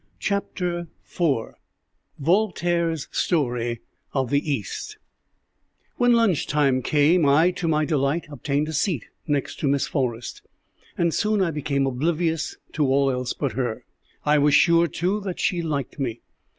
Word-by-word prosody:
CHAPTER 180 -4 -2 0.2
IV 140 -10 -1 0.6
VOLTAIRE'S 170 -2 +1
STORY 120 -7 0 0.3
OF 130 -3 -1
THE 145 +1 +1
EAST 115 -8 -4 1.0
When 245 0 +4
lunch 225 - +2
time 135 -3 +2
came, 155 +6 +3
I, 155 +6 +5
to 175 -1 -4
my 155 -1 +2
delight, 145 +1 0
obtained 145 +2 -1
a 160 - -4
seat 155 - 0 0.2
next 145 -2 -1
to 145 - 0
Miss 140 0 +2
Forrest, 120 -5 -3 0.6
and 170 -2 +1
soon 215 -1 +1
I 185 -3 +2
became 140 -2 -1
oblivious 160 +4 -1 0.2
to 150 -3 +1
all 135 +1 +3
else 125 0 -2
but 140 -4 -2
her. 120 -4 -3 0.4
I 150 0 +4
was 145 0 +4
sure, 170 0 +5
too, 180 +7 -1
that 190 -3 -5
she 175 -3 +1
liked 145 -4 -3
me. 120 -4 -3
150 Hz, 145 wpm, -24 LUFS, 135-170 Hz, 1.0 s, I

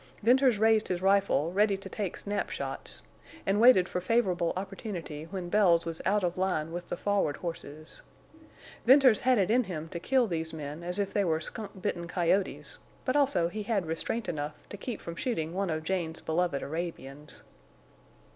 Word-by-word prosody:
Venters 250 0 +5
raised 220 0 +4
his 180 -1 -1
rifle, 195 -5 +3
ready 205 0 +3
to 195 0 -9
take 195 -1 -4
snap 205 0 -2
shots, - - -4 0.4
and 200 +2 +2
waited 230 -7 +7
for 180 - -3
favorable 185 -5 +1
opportunity 185 -6 -5
when 185 0 -5
Bells 175 -4 +4
was 165 -1 -5
out 205 +1 +2
of 175 0 -1
line 165 -4 0
with 175 +1 -6
the - - -3
forward 200 -7 0
horses. 155 -3 -6 0.8
Venters 260 -2 +7
had 255 -1 +3
it 195 0 +2
in 245 +1 +3
him 160 -4 -5
to 170 - -5
kill 255 +6 +2
these 165 -5 -3
men 150 0 -6
as 180 +2 -2
if 200 -1 -1
they 205 - +2
were 160 -3 +1
skunk 200 +3 -6
bitten 170 -1 -2
coyotes, 180 +2 0 0.3
but 255 - 0
also 275 -12 +3
he 210 +5 -5
had 205 -3 0
restraint 165 +8 -2
enough 150 -2 -5
to - - -6
keep 235 +4 -5
from 170 - -7
shooting 165 -8 -2
one 195 0 -1
of 155 -1 -2
Jane's 170 -2 -2
beloved 160 -3 0
Arabians. 150 -3 -6
185 Hz, 180 wpm, -29 LUFS, 165-210 Hz, 0.8 s, waited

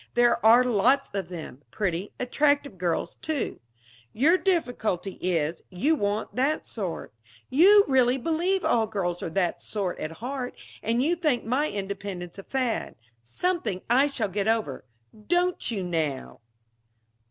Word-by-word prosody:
There 240 -1 +3
are 230 +3 +7
lots 250 +4 +2
of 195 -2 -3
them. 160 -6 -8
Pretty, 185 - -2
attractive 285 - +1
girls, 170 -1 -1
too. 310 -4 -3 0.5
Your 295 +10 +4
difficulty 245 - -1
is, 165 -2 0
you 240 - +1
want 210 -6 -1
that 280 +5 0
sort. 190 - -5 0.4
You 400 +8 +7
really 255 -1 +3
believe 340 +7 0
all 225 -2 +2
girls 180 -5 -2
are - - -3
that 175 +1 -1
sort 195 -4 -3
at 155 +1 -4
heart, 250 +6 -5 0.2
and 230 +3 +1
you 335 +5 +2
think 305 -7 0
my 265 +6 +1
independence 195 -2 -5
a - - -8
fad 255 -2 -2 0.3
something 215 - -2
I 265 +4 +5
shall 250 -7 -2
get 200 +2 -2
over. 220 - -1 0.4
Don't 355 -2 +1
you, 205 -5 -2
now?" 160 -6 -3
225 Hz, 140 wpm, -26 LUFS, 185-280 Hz, 0.5 s, are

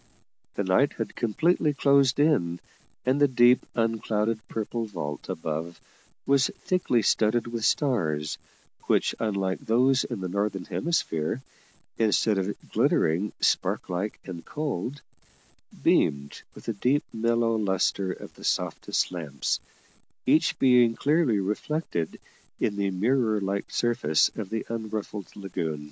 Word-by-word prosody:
The 100 - 0
night 95 +10 +3
had 115 -2 -5
completely 150 - +1
closed 140 -1 +4
in, 90 - +2 0.5
and 130 +3 +2
the 145 - +7
deep, 125 -1 +5
unclouded 115 -1 0
purple 115 +1 -3
vault 75 -8 -6
above 80 +2 -4 0.5
was 140 -1 +3
thickly 150 -11 +1
studded 110 +2 +2
with 115 -1 -4
stars, 80 - 0 0.5
which, - - +2
unlike 100 -4 -1
those 130 +3 +3
in 120 -5 -5
the 95 - -3
northern 100 0 -2
hemisphere, 130 - -1 0.6
instead 110 -2 +3
of 95 +2 -2 0.2
glittering 85 +7 +2
spark - - +1
like 95 +4 -2
and 85 -3 -7
cold, 145 - -4 0.8
beamed 70 0 +2
with - - -12
the 115 - -2
deep, 130 +8 +1
mellow 115 0 +1
lustre 95 -2 0
of - - -9
the - - -15
softest - - 0
lamps, 75 -7 -2 0.7
each 160 +1 +3
being 125 -3 +5
clearly 145 -5 +2
reflected 105 - -2 0.4
in 100 - 0
the 100 -1 0
mirror 110 +3 +1
like 100 0 -2
surface 120 -10 +2
of 105 -4 -5
the 110 -1 -3
unruffled 110 -3 -4
lagoon. 85 -6 -3
110 Hz, 125 wpm, -27 LUFS, 95-125 Hz, 0.8 s, the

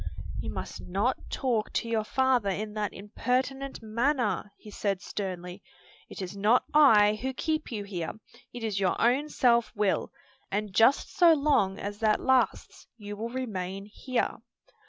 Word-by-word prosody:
"You - - -5
must - - -6
not - - -1
talk 240 -6 -1
to - - -1
your 225 -2 0
father 255 -2 +2
in 210 +2 -3
that 210 -1 -2
impertinent 255 +6 -2
manner," 235 -1 0
he 210 - -13
said 200 -2 -1
sternly. 185 -2 -5 0.5
"It - - -6
is 185 +2 -6
not 210 +5 +3
I 215 -8 +6
who 265 +1 -2
keep 310 -1 -2
you 210 -3 -3
here, 180 -5 -4 0.4
it 240 - -8
is 210 -3 -1
your 190 -2 +1
own 265 +6 +2
self 235 -4 +3
will; 205 -2 0 0.4
and 205 0 -2
just 225 +8 +3
so 345 -2 +7
long 280 -10 +2
as 205 +1 -5
that 215 -1 +2
lasts 255 -5 0
you 205 -2 -7
will 225 +3 -4
remain 195 -6 -4
here." 245 +4 -2
215 Hz, 155 wpm, -28 LUFS, 205-255 Hz, 0.5 s, so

